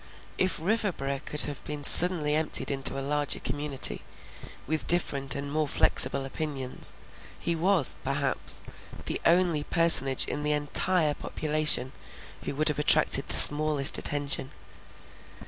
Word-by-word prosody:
If 185 -2 -2
Riverboro 170 -8 -5
could 150 - 0
have 145 -1 -4
been 150 -1 -9
suddenly 160 -1 +6
emptied 155 -1 -2
into 135 0 -3
a 135 - -7
larger 145 0 -4
community, 145 +1 -1 0.6
with 155 +2 -5
different 140 -5 -1
and 140 0 -9
more 155 0 -4
flexible 140 -1 +4
opinions, 135 -2 -5 0.4
he 170 - -5
was, 170 -3 +2
perhaps, - - -4 0.4
the - - -5
only 170 -3 -1
personage 145 -6 +3
in 145 - -7
the 150 0 -2
entire 150 +2 -2
population 150 -4 0 0.5
who - - -7
would 155 +2 -1
have 150 - -6
attracted 150 -2 +2
the - - -2
smallest 145 -2 +5
attention. 145 -2 -3
150 Hz, 130 wpm, -24 LUFS, 140-160 Hz, 0.6 s, suddenly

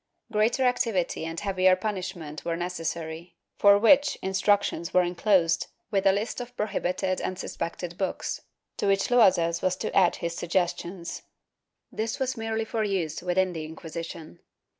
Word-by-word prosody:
Greater 220 +5 +2
activity 225 -10 0
and 165 0 -4
heavier 185 -2 +3
punishment 185 -6 -5
were 170 -1 -2
necessary, 170 -1 -4 0.2
for 200 0 +7
which 280 +7 +5
instructions 190 -3 +1
were 180 - +6
enclosed, 175 -1 +2 0.2
with 195 -1 +2
a - - +7
list 210 +5 -2
of 245 0 -9
prohibited 185 -2 -1
and 185 - -3
suspected 175 -1 -5
books, 190 - -2 0.4
to - - -1
which 195 0 +2
Loazes 175 -8 +4
was 185 0 +1
to - - -4
add 185 -3 +5
his 170 0 -4
suggestions.* 175 0 -2 0.7
This 220 +1 -2
was 260 -1 -1
merely 225 -1 -2
for 220 0 -1
use 185 -7 -1
within 180 +1 +1
the 160 -2 -4
Inquisition. 160 - -8
185 Hz, 145 wpm, -27 LUFS, 170-210 Hz, 0.7 s, for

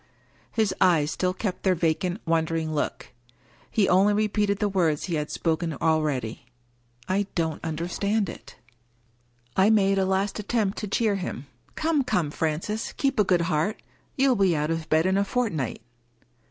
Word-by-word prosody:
" - - -33
His 215 -4 +1
eyes 160 -5 +4
still 180 -1 0
kept 185 0 -4
their 190 -1 +2
vacant, 170 +4 0
wondering 160 -1 0
look. 150 - -3 0.6
He 205 -4 +2
only 195 +3 +4
repeated 210 -1 +1
the 210 - +1
words 170 -7 +1
he 180 - -3
had 150 -1 -1
spoken 165 0 -1
already: 145 -7 -1 0.3
" - - -40 0.3
I 195 +1 0
don't 160 -3 -1
understand 180 +6 -1
it." - - -10 1.0
I 190 +2 +5
made 195 -3 +3
a 190 - +2
last 195 +2 0
attempt 210 -1 -1
to 210 - -4
cheer 205 0 +1
him. 175 -7 -5
" 115 - -35
Come, 315 -3 +1
come, 180 - 0
Francis! 165 +9 -2
keep 270 -4 0
a - - +6
good 180 -3 +2
heart. 170 +4 0 0.4
You 270 0 +3
will 230 -6 +3
be 180 -3 +3
out 150 +1 0
of 165 -1 -3
bed 160 +2 +3
in 190 +1 +2
a - - +3
fortnight." 195 - -2
185 Hz, 175 wpm, -26 LUFS, 160-205 Hz, 1.0 s, a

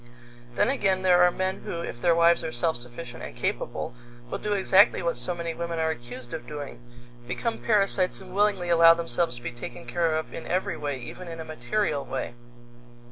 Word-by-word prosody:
Then 250 - +3
again 190 -8 +1
there 180 -1 +5
are 180 - +7
men 185 +1 -1
who, 170 - -4
if 120 - -6
their 170 -1 +4
wives 170 0 +4
are 160 - -3
self 160 +6 0
sufficient 120 0 -8
and - - -7
capable, 90 - -2 0.4
will - - -2
do 210 - -1
exactly 195 -1 +5
what 170 - 0
so 180 - -2
many 170 -1 -3
women 170 0 -4
are 160 0 +1
accused 120 -2 -8
of 160 - -6
doing 145 -5 -7 0.5
become 225 - -2
parasites 195 -4 +2
and 185 -1 -11
willingly 200 -3 +2
allow 165 -1 +8
themselves 165 -3 0
to 120 - -11
be - - -3
taken 120 +1 -8
care 160 +6 +1
of 160 - -3
in - - -7
every 185 +1 0
way, 145 -2 -3
even 150 +8 -8
in 165 -1 -7
a 160 - -5
material 155 - -1
way. 130 -2 -4
165 Hz, 200 wpm, -27 LUFS, 130-185 Hz, 0.5 s, allow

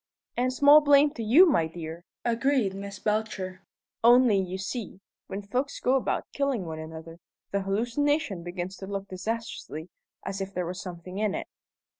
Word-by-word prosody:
'" - - -61
"And 250 +1 +1
small 285 +3 +7
blame 290 0 +5
to 235 - -6
you, 250 - +7
my 275 - +3
dear!" 165 +1 -8 0.2
agreed 235 -3 +2
Miss 200 +1 -7
Belcher; 205 -3 -2 0.4
"only, 240 -3 +6
you 185 0 -3
see, 195 0 -5 0.3
when 200 +1 -5
folks 255 +8 -2
go 255 - +2
about 265 - 0
killing 275 -9 0
one 160 -1 -5
another, 160 +1 -9 0.3
the 200 - 0
hallucination 235 - 0
begins 175 +2 -5
to 190 - -8
look 200 0 -4
disastrously 185 -5 -5 0.4
as 195 0 -3
if 195 +1 -5
there 180 0 -1
were 175 - -3
something 180 +1 -7
in 210 -2 0
it." - - -4
200 Hz, 170 wpm, -27 LUFS, 185-245 Hz, 0.4 s, small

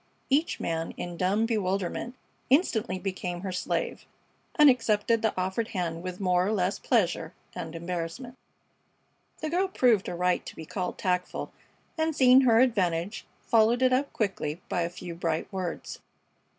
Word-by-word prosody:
Each 300 +5 +2
man 165 0 -3
in 175 -1 -5
dumb 195 +5 +1
bewilderment 200 +1 -1 0.3
instantly 245 - +2
became 185 -2 -4
her 190 -1 -4
slave, 180 - -2 0.5
and 300 -1 +7
accepted 230 -3 +3
the 220 - +2
offered 190 +5 -1
hand 170 -6 -3
with 185 0 -6
more 180 -2 +2
or - - +1
less 190 -2 0
pleasure 180 -7 0 0.2
and 165 0 -6
embarrassment. 175 +9 -5 1.1
The 310 0 -2
girl 370 +3 +2
proved 245 - +3
her - - -3
right 180 +1 +1
to - - -9
be 160 - -8
called 180 +2 -4
tactful, 180 -1 -2 0.5
and, 315 -1 +1
seeing 255 -1 +7
her 235 -3 +5
advantage, 190 -6 0 0.2
followed 230 +2 +3
it 255 0 +4
up 275 +2 +1
quickly 180 -7 -2
by 175 - 0
a 170 - 0
few 175 0 -8
bright 165 +2 -2
words. 185 -3 -4
190 Hz, 155 wpm, -28 LUFS, 175-235 Hz, 1.1 s, and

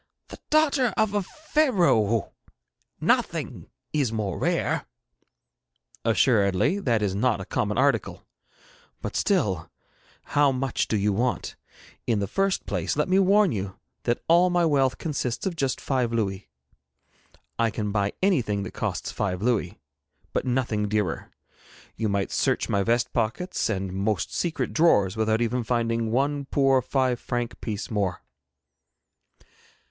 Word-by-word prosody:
The - - -10
daughter 290 -6 +3
of 220 -2 +2
a 205 - +1
Pharaoh! 185 - +1 0.7
Nothing - - 0 0.2
is 140 -7 +1
more 105 -5 -2
rare.' - - 0 1.2
'Assuredly 110 - +3
that 115 - +1
is 100 -2 0
not 110 +1 +1
a 95 - -6
common 105 +3 -1
article, 140 +2 +1 0.8
but - - -4
still, 105 - 0 0.5
how 145 -1 +3
much 130 -1 -1
do 110 - 0
you 100 0 +1
want? 120 +4 -1 0.5
In 115 - +2
the 100 - 0
first 195 - 0
place - - -2
let 150 +4 +1
me 190 +1 +4
warn 195 0 +4
you 95 -2 -4 0.3
that 120 0 0
all 175 +2 +5
my 175 -1 +2
wealth 135 -4 +2
consists 135 -6 -3
of 190 -3 -1
just 135 -4 -1
five 125 -4 0
louis. 100 -6 -2 1.1
I 115 -1 +3
can 105 -1 -3
buy 100 -1 0
anything 120 - +1
that - - -7
costs - - -3
five 95 -2 -2
louis, 115 -7 0 0.5
but - - -1
nothing 120 -5 0
dearer. 100 -7 -1 0.7
You 110 - -1
might 100 -1 -1
search - - +1
my 100 - +2
vest 120 +4 +1
pockets 120 - -1
and 95 -3 -2
most 100 +1 -1
secret 170 -2 -2
drawers 105 - +3
without 110 +1 +1
even 120 +1 -1
finding 115 -1 0
one 140 +4 0
poor 135 -1 +3
five 130 -2 0
franc 120 -1 -4
piece 110 0 -4
more.' 100 -5 -1
120 Hz, 140 wpm, -25 LUFS, 105-145 Hz, 1.2 s, all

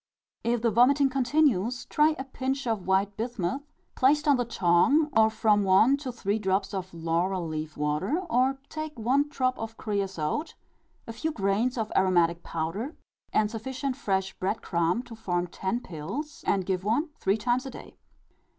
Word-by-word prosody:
If 235 0 0
the 230 - +3
vomiting 270 +5 +4
continues, 255 -4 +1
try 305 +1 +3
a 265 - -4
pinch 270 0 -3
of 220 -6 -2
white 195 +1 +2
bismuth, 225 0 -2 0.3
placed 295 +3 +3
on 290 - +6
the 245 -1 0
tongue, 230 - +3
or 220 0 +6
from 215 -1 +2
one 195 +8 +5
to 275 -3 -5
three 220 -3 -1
drops 195 0 0
of 190 -1 -4
laurel 170 +2 -1
leaf 155 -1 -5
water; 150 - 0
or, 260 -1 +2
take 310 -2 -6
one 265 +6 +1
drop 255 -3 -1
of 225 0 -6
creasote, 200 - -2 0.5
a 230 - -7
few 320 +8 -2
grains 220 +3 0
of 220 -2 -2
aromatic 175 -3 +3
powder, 170 - -4 0.4
and 215 -1 +2
sufficient 255 +4 -3
fresh 190 -7 -1
bread 195 +4 -2
crumb 170 +6 0
to 240 - -11
form 180 -6 -2
ten 190 +6 -3
pills; 200 - -6
and 190 -2 +1
give 185 -1 -1
one 235 - +1
three 195 +2 +1
times 245 +4 0
a - - -5
day. - - -11
220 Hz, 170 wpm, -27 LUFS, 190-260 Hz, 0.5 s, on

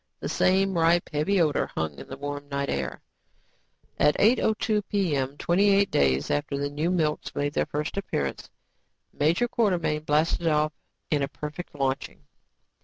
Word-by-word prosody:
The - - -4
same 190 +1 +2
ripe, 170 +1 +3
heavy 185 +7 +1
odor 155 -4 +2
hung 80 -2 -3
in - - -10
the 135 - -8
warm 145 0 -6
night 140 0 -2
air. 65 -1 -3 1.0
At 150 - +4
8:02 220 -1 +2
p.m., 145 -9 0
twenty 190 +6 +2
eight 200 0 +3
days 70 0 +2
after 145 -1 -1
the 145 0 -2
new 150 +4 -1
milks 160 -4 -1
made 145 0 -1
their - - 0
first 150 +5 -3
appearance, 70 - -3 0.6
Major 165 +11 +2
Quartermain 180 -10 0
blasted 155 +3 +1
off 155 -1 +2 0.4
in 150 -2 +2
a 140 - 0
perfect 150 +4 -7
launching. 135 +1 -2
150 Hz, 155 wpm, -26 LUFS, 145-180 Hz, 1.0 s, At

